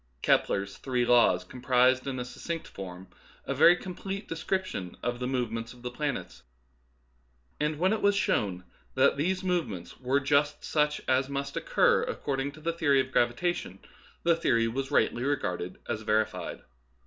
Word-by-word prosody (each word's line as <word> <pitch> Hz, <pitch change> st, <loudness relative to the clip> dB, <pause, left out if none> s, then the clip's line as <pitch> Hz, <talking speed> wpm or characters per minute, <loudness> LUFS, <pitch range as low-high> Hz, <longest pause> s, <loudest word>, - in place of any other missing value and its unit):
Kepler's 100 Hz, 0 st, +1 dB
three 125 Hz, -2 st, 0 dB
laws 120 Hz, -7 st, +4 dB
comprised 125 Hz, +4 st, +2 dB
in 135 Hz, -1 st, -2 dB
succinct 165 Hz, +6 st, -5 dB
form 95 Hz, -1 st, -9 dB, 0.4 s
a -, -, -1 dB
very 175 Hz, -, +7 dB
complete 190 Hz, +2 st, -6 dB
description 165 Hz, -, -3 dB
of 120 Hz, 0 st, -2 dB
the 125 Hz, -, -2 dB
movements 115 Hz, -3 st, -2 dB
of 125 Hz, -1 st, -17 dB
the 125 Hz, -, -4 dB
planets; 125 Hz, -, -4 dB, 1.2 s
and 150 Hz, 0 st, 0 dB
when 185 Hz, +6 st, +2 dB
it 220 Hz, -, -2 dB
was 200 Hz, 0 st, +4 dB
shown 95 Hz, -, 0 dB, 0.3 s
that -, -, +4 dB
these 185 Hz, +6 st, -1 dB
movements 165 Hz, -, -2 dB
were 130 Hz, +2 st, +1 dB
just 145 Hz, +1 st, +1 dB
such 150 Hz, -1 st, +1 dB
as 130 Hz, +1 st, +2 dB
must 140 Hz, 0 st, -3 dB
oc -, -, -4 dB
cur -, -, +4 dB
according 135 Hz, 0 st, -2 dB
to 155 Hz, -, -13 dB
the 165 Hz, +2 st, -2 dB
theory 150 Hz, -5 st, +3 dB
of 130 Hz, 0 st, -1 dB
gravitation, 120 Hz, -, 0 dB, 0.5 s
the 170 Hz, 0 st, +4 dB
theory 115 Hz, -8 st, +2 dB
was 130 Hz, +4 st, -3 dB
rightly 120 Hz, -, +2 dB
regarded 90 Hz, -10 st, -2 dB
as 110 Hz, -, -2 dB
verified. 110 Hz, 0 st, -1 dB
135 Hz, 160 wpm, -29 LUFS, 115-155 Hz, 1.2 s, very